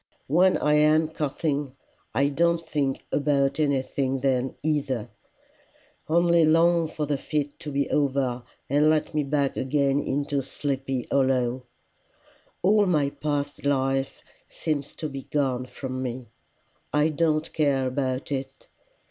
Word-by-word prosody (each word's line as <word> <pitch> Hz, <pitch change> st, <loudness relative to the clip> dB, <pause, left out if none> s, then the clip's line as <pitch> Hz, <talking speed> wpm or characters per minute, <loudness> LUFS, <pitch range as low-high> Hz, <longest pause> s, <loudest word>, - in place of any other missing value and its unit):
When 180 Hz, +6 st, +4 dB
I 150 Hz, -, +2 dB
am 155 Hz, +1 st, +4 dB
coughing, 145 Hz, -2 st, -2 dB, 0.4 s
I 140 Hz, +3 st, +3 dB
don't 170 Hz, +2 st, +1 dB
think 140 Hz, -4 st, -1 dB
about 140 Hz, 0 st, +1 dB
anything 135 Hz, -2 st, 0 dB
then 130 Hz, -1 st, 0 dB
either 145 Hz, -7 st, -1 dB, 1.0 s
only 170 Hz, 0 st, +4 dB
long 165 Hz, +1 st, +4 dB
for 155 Hz, -1 st, -3 dB
the 145 Hz, -1 st, -1 dB
fit 145 Hz, -1 st, -3 dB
to 150 Hz, -, -6 dB
be 140 Hz, 0 st, 0 dB
over 135 Hz, -4 st, +1 dB, 0.3 s
and 145 Hz, +3 st, +3 dB
let 155 Hz, 0 st, +1 dB
me 150 Hz, -1 st, +1 dB
back 140 Hz, -1 st, 0 dB
again 140 Hz, +1 st, +1 dB
into 140 Hz, 0 st, -1 dB
Sleepy 135 Hz, -1 st, -3 dB
Hollow. 130 Hz, -2 st, +1 dB, 1.0 s
All 205 Hz, +2 st, +4 dB
my 150 Hz, -5 st, +2 dB
past 145 Hz, -1 st, -3 dB
life 135 Hz, -1 st, 0 dB, 0.3 s
seems 145 Hz, -3 st, -3 dB
to 155 Hz, -, -4 dB
be 135 Hz, -2 st, -7 dB
gone 130 Hz, -4 st, 0 dB
from 130 Hz, 0 st, -5 dB
me. 125 Hz, -2 st, -5 dB, 0.6 s
I 150 Hz, +2 st, +3 dB
don't 155 Hz, 0 st, 0 dB
care 140 Hz, -4 st, +1 dB
about 130 Hz, +1 st, -2 dB
it. 135 Hz, -1 st, -5 dB
140 Hz, 130 wpm, -25 LUFS, 135-155 Hz, 1.0 s, When